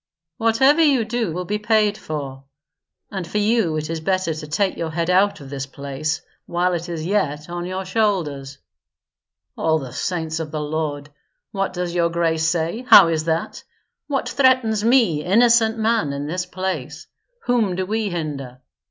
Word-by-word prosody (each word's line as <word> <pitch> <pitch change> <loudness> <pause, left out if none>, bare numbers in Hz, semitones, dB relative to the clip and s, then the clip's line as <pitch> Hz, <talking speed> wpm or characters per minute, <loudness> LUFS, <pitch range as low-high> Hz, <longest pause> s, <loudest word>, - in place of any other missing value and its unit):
"Whatever 265 +8 +4
you 275 -7 +4
do 225 -4 -2
will 180 +3 -4
be 210 +3 -2
paid 215 -1 +2
for; 140 -7 -6 0.7
and 190 -4 -4
for 210 - -3
you 210 -6 +2
it 155 0 -3
is 165 +1 -3
better 185 0 0
to 155 0 -7
take 190 +6 0
your 165 - -3
head 170 +2 -1
out 195 +3 +3
of 140 -1 -11
this 135 -1 -4
place 140 +3 -4 0.2
while 180 +1 0
it 175 +1 -3
is 160 -2 -4
yet 165 -5 -1
on 175 0 -4
your 185 +1 -4
shoulders." 170 -10 -1 1.0
"All 160 0 +1
the 135 -5 -7
Saints 165 -3 -2
of 160 -2 -4
the 155 0 -4
Lord! 150 -1 -3 0.4
What 195 -1 -1
does 180 -1 -3
your 170 -1 +2
grace 165 -1 0
say? 170 +7 -1
How 165 - +9
is 160 -1 -1
that? 165 0 -2 0.4
What 275 -2 -1
threatens 255 -6 +2
me, 225 - +3
innocent 225 +3 +4
man, 220 -10 +1
in 140 +1 -4
this 180 +4 -3
place? 175 -6 -4 0.4
Whom 225 -7 +1
do 185 +1 -2
we 215 +1 -1
hinder?" 145 -7 -5
175 Hz, 170 wpm, -21 LUFS, 155-210 Hz, 1.0 s, How